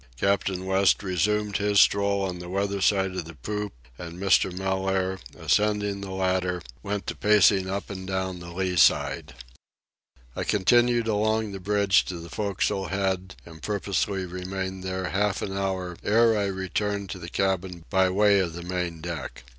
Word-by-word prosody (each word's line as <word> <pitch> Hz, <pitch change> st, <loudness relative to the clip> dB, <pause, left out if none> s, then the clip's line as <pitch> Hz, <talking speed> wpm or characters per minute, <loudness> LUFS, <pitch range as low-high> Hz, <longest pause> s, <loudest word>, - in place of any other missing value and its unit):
Captain 95 Hz, +1 st, 0 dB
West 95 Hz, +1 st, +3 dB
resumed 105 Hz, +2 st, 0 dB
his 105 Hz, 0 st, +2 dB
stroll 100 Hz, 0 st, +3 dB
on 90 Hz, -2 st, -3 dB
the 90 Hz, 0 st, -8 dB
weather 100 Hz, +1 st, -1 dB
side 95 Hz, -1 st, +2 dB
of 90 Hz, -3 st, -3 dB
the 80 Hz, 0 st, -10 dB
poop, 105 Hz, +5 st, -4 dB, 0.3 s
and 85 Hz, 0 st, -7 dB
Mr. 95 Hz, -1 st, +3 dB
Mellaire, 95 Hz, 0 st, -1 dB, 0.2 s
ascending 105 Hz, -1 st, +1 dB
the 100 Hz, -, -6 dB
ladder, 95 Hz, -2 st, -1 dB, 0.2 s
went 100 Hz, -1 st, -3 dB
to -, -, -4 dB
pacing 100 Hz, -2 st, +4 dB
up 100 Hz, +1 st, -3 dB
and 95 Hz, -1 st, -7 dB
down 95 Hz, -1 st, -2 dB
the 85 Hz, 0 st, -9 dB
lee 90 Hz, 0 st, -2 dB
side. 65 Hz, -, +3 dB, 1.0 s
I -, -, -2 dB
continued 120 Hz, +4 st, +3 dB
along 110 Hz, 0 st, +1 dB
the 95 Hz, -, -6 dB
bridge 100 Hz, +1 st, +3 dB
to 90 Hz, -, -5 dB
the 85 Hz, 0 st, -9 dB
forecastle 100 Hz, 0 st, -1 dB
head 95 Hz, -1 st, -2 dB
and 80 Hz, -2 st, -13 dB
purposely 100 Hz, -1 st, -1 dB
remained 95 Hz, +1 st, -5 dB
there 95 Hz, -1 st, -3 dB
half 105 Hz, +1 st, 0 dB
an 95 Hz, -, -4 dB
hour 95 Hz, -2 st, -2 dB
ere 115 Hz, +1 st, +4 dB
I 105 Hz, -1 st, +1 dB
returned 100 Hz, +1 st, -2 dB
to 95 Hz, -, -6 dB
the 85 Hz, 0 st, -7 dB
cabin 95 Hz, -3 st, -1 dB
by 95 Hz, -2 st, +4 dB
way 100 Hz, +1 st, +4 dB
of 85 Hz, -4 st, -1 dB
the 85 Hz, +1 st, -7 dB
main 90 Hz, -2 st, -3 dB
deck. 80 Hz, -7 st, -6 dB
95 Hz, 170 wpm, -26 LUFS, 90-100 Hz, 1.0 s, pacing